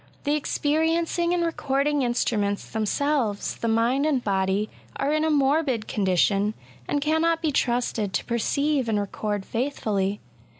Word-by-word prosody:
The 290 - +1
experiencing 325 +3 0
and 350 -1 +1
recording 285 -2 0
instruments 220 -5 0
them 220 -1 -2
selves, 270 -7 0
the 230 - -2
mind 235 +6 +2
and 270 -5 0
body^ 195 +1 +1 0.3
are 285 +2 0
in 310 0 +1
a 320 - +2
morbid 280 -5 +2
condition^ 200 +2 +1 0.3
and 290 - 0
cannot 320 +2 +2
be 320 -2 0
trusted 240 -5 0
to - - -1
perceive 270 +2 0
and 210 -2 +1
record 205 0 -3
faithfully. 210 -6 -1
255 Hz, 140 wpm, -25 LUFS, 210-300 Hz, 0.3 s, mind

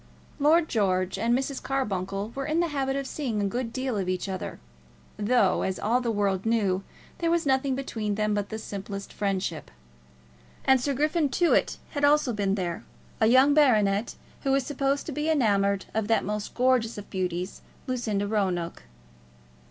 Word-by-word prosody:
Lord 315 +3 +4
George 185 -5 0
and 235 +2 +2
Mrs. 270 0 -3
Carbuncle 200 -6 -2
were 275 +1 -4
in 310 +2 +1
the 340 -1 +1
habit 270 -2 -1
of 275 0 -2
seeing 255 -5 -3
a 205 - +1
good 230 +4 -2
deal 255 -2 -2
of 190 -2 -1
each 185 +1 -2
other, 190 -2 -5 0.6
though, 210 -2 +2
as 190 -1 -1
all 240 +4 +1
the 240 - -1
world 200 -3 0
knew, 200 -5 +1 0.4
there 335 - +1
was 335 -1 +1
nothing 265 0 +2
between 220 -6 -3
them 210 0 0
but 205 -1 -1
the 220 - -4
simplest 200 -2 -6
friendship. 190 - -2 1.0
And 265 -1 +5
Sir 280 +2 0
Griffin 305 +2 +1
Tewett 340 +6 +2
had 290 -2 -3
also 290 -3 +4
been 200 -2 0
there, 175 -4 -3 0.4
a 220 - +4
young 260 +4 +6
baronet 215 -8 +3 0.3
who 275 - 0
was 270 -1 +2
supposed 275 0 -1
to - - -5
be 300 +3 -2
enamoured 200 -9 +2
of 220 -1 -1
that 225 - +2
most 210 +1 -4
gorgeous 250 -3 +2
of 205 - -7
beauties, 180 0 -3 0.2
Lucinda 220 -6 -1
Roanoke. 190 -5 -1
225 Hz, 175 wpm, -27 LUFS, 200-270 Hz, 1.0 s, young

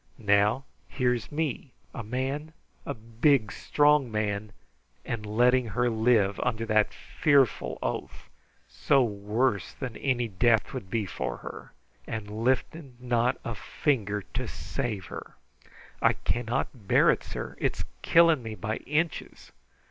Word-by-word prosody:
Now, 105 +3 +3 0.2
here's 125 -2 -1
me, 145 -3 -3 0.2
a - - -5
man, 135 +7 -3 0.3
a 140 - -2
big, 115 +1 +2
strong 145 -4 +3
man, 105 -1 -2 0.5
and 105 -2 -4
letting 125 +3 +3
her 120 0 +3
live 110 -3 +3
under 115 -2 -1
that 110 -1 +3
fearful 140 -5 +1
oath, - - -4 0.4
so 140 -2 +2
worse 105 0 -1
than 125 -4 -6
any 125 -3 0
death 110 +2 +3
'twould 95 - -7
be 110 -1 0
for 65 -9 -4
her, - - -9 0.3
and 110 0 -5
lifting 130 +1 -1
not 125 0 +1
a 115 - -2
finger 105 -4 -1
to - - -2
save 95 - -4
her. - - -9 0.7
I - - +5
cannot 120 0 -1 0.2
hear - - +6
it, - - -2
sir. - - -6
It's - - -1 0.2
killing 165 -4 +5
me 110 -2 -6
by 110 +1 -3
inches! 155 +4 -3
120 Hz, 135 wpm, -28 LUFS, 105-130 Hz, 0.7 s, hear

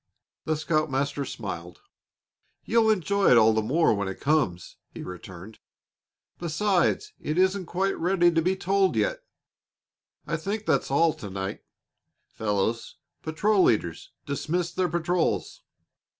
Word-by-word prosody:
The 155 -1 0
scoutmaster 145 -3 -1
smiled. 410 - -7 0.8
"You'll 230 -1 +3
enjoy 200 -1 +2
it 125 - +7
all 110 0 +6
the 110 - +1
more 150 +6 +2
when 100 -2 -2
it 95 - -6
comes," 135 - 0
he - - -9
returned. 90 +3 -10 0.8
"Besides, 190 - 0
it 155 +2 -3
isn't 190 -1 +2
quite 190 +3 0
ready 175 0 +3
to 165 -1 +2
be 185 +3 +1
told 190 0 +1
yet. - - 0 1.0
I 165 - -2
think 205 +6 -4
that's - - +1
all 155 +4 +3
to 100 - -9
night, 95 +1 -5 0.6
fellows. 110 +1 -2 0.3
Patrol 195 +6 +1
leaders 85 - +1 0.2
dismiss 170 +5 -2
their 180 0 0
patrols." 175 +1 -1
165 Hz, 130 wpm, -26 LUFS, 115-190 Hz, 1.0 s, it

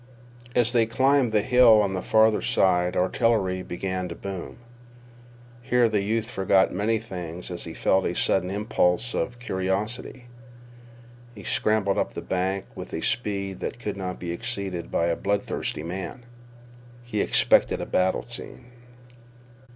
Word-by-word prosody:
As 120 -1 +3
they 115 -2 +3
climbed 130 +1 +3
the 105 -1 +2
hill 125 -3 +6
on 100 -2 +1
the 95 - -2
farther 110 0 +3
side 90 -1 +2
artillery 95 -1 +1
began 90 0 -4
to 85 - -6
boom. 100 +3 -7 1.0
Here 125 -1 +3
the 105 -2 0
youth 110 +2 -1
forgot 95 -3 +2
many 105 +4 +1
things 90 -5 -7
as 85 - -5
he 80 - -8
felt 95 0 +2
a 85 - -3
sudden 90 -1 +2
impulse 105 +1 0
of 120 - -2
curiosity. 105 +4 -3 1.1
He 100 - -10
scrambled 105 -2 +1
up - - -2
the - - -5
bank 95 +1 -1
with - - -9
a - - -3
speed 100 -5 -1
that - - -4
could 105 -4 -4
not 95 -2 -4
be 85 -1 -4
exceeded 95 -4 -4
by 85 - +1
a 85 -1 +1
bloodthirsty 100 -6 -2
man. 95 +7 -6 0.8
He 110 -4 -2
expected - - +3
a - - -3
battle 95 0 0
scene. 120 +1 -9
100 Hz, 150 wpm, -25 LUFS, 95-115 Hz, 1.1 s, hill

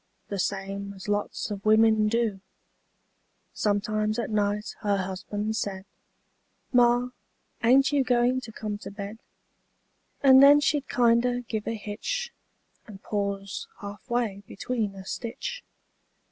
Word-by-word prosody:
The 200 - -3
same 200 +1 -3
as 190 +2 -10
lots 205 +1 -2
of 200 -1 -5
wimmin 220 0 +4
do; 225 -4 0 1.1
Sometimes 215 +1 0
at 235 -2 -2
night 210 0 0
her 205 -2 +1
husban' 195 +3 -3
said, 195 -3 -3 0.9
"Ma, 245 0 +4 0.5
ain't 270 +4 +5
you 285 -2 +3
goin' 250 0 +2
to 225 - -9
come 210 -1 -5
to - - -8
bed?" 200 +2 -7 1.0
And 265 -1 +8
then 285 +1 +8
she'd 295 -1 0
kinder 245 +1 +3
give 220 -3 -5
a 230 - -1
hitch, 225 - -4 0.5
And 200 -3 -12
pause 200 -1 -3
half 205 +4 -9
way 230 -5 -1
between 215 -2 -3
a 190 -1 -10
stitch. 485 - -5
215 Hz, 130 wpm, -27 LUFS, 200-245 Hz, 1.1 s, And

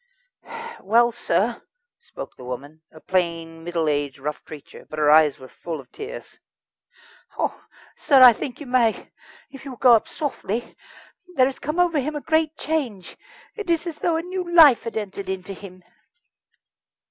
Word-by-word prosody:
"Well, 235 +3 +3
sir," 235 - -1 0.4
spoke 470 - -10
the - - -13
woman, 140 +5 -8
a 155 - -14
plain, 165 -2 -2
middle 170 -2 -1
aged, 145 -2 -1
rough 150 +2 -5
creature, 150 -2 -12
but 155 - -8
her 150 -1 +4
eyes 155 -2 +5
were 130 - -12
full 160 +3 -7
of 135 - -14
tears: 435 +4 -9 1.0
"Oh, - - -2 0.3
sir, 275 -3 +4
I 245 -2 +10
think 245 +3 -6
you 295 - -8
may, 245 -3 +1 0.4
if 270 - -12
you 275 - -8
will 255 - -9
go 245 0 +6
up 225 - +3
softly. 240 - -4 0.6
There 255 - +5
has 265 0 -3
come 305 +4 -3
over 345 -4 +3
him 300 +3 -3
a 295 - -4
great 315 0 0
change. 255 - -3 0.4
It 425 -5 -7
is 335 0 +1
as 325 -3 -5
though 340 - +1
a 325 - -1
new 360 -1 -5
life 310 -8 +7
had 230 - -4
entered 200 -2 -5
into 190 +1 -4
him." 185 -1 -12
230 Hz, 170 wpm, -23 LUFS, -, 1.0 s, I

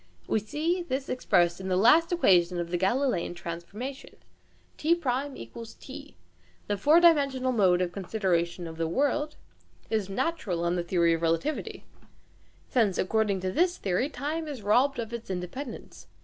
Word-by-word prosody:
We - - +1
see 315 - -1
this 275 -5 -3
expressed 175 -8 +1
in 190 - -5
the 185 -1 +1
last 315 - +5
equation 180 - +3
of 170 0 -4
the 175 - +1
Galileian 195 -2 0
transformation 185 +11 -7 0.6
(t1 265 - -2
= - - -32
t) 260 - -11 0.5
The 205 - -1
four 295 - +5
dimensional 280 -6 +3
mode 185 -6 +3
of 175 - -3
consideration 180 -3 -1
of 160 -1 -8
the 165 0 -1
"world" 290 - 0 0.6
is 215 -3 0
natural 195 - -2
on 170 +1 +1
the 175 - 0
theory 170 -1 +2
of 165 - -2
relativity, 170 - -2 0.8
since 220 -7 +1
according 205 -1 +1
to 185 0 -2
this 350 - +1
theory 195 +8 -1
time 310 +2 -4
is 275 -8 -7
robbed 255 +7 +3
of 235 -1 -5
its 235 -3 -6
independence. 190 +8 -6
220 Hz, 155 wpm, -28 LUFS, 180-280 Hz, 0.8 s, last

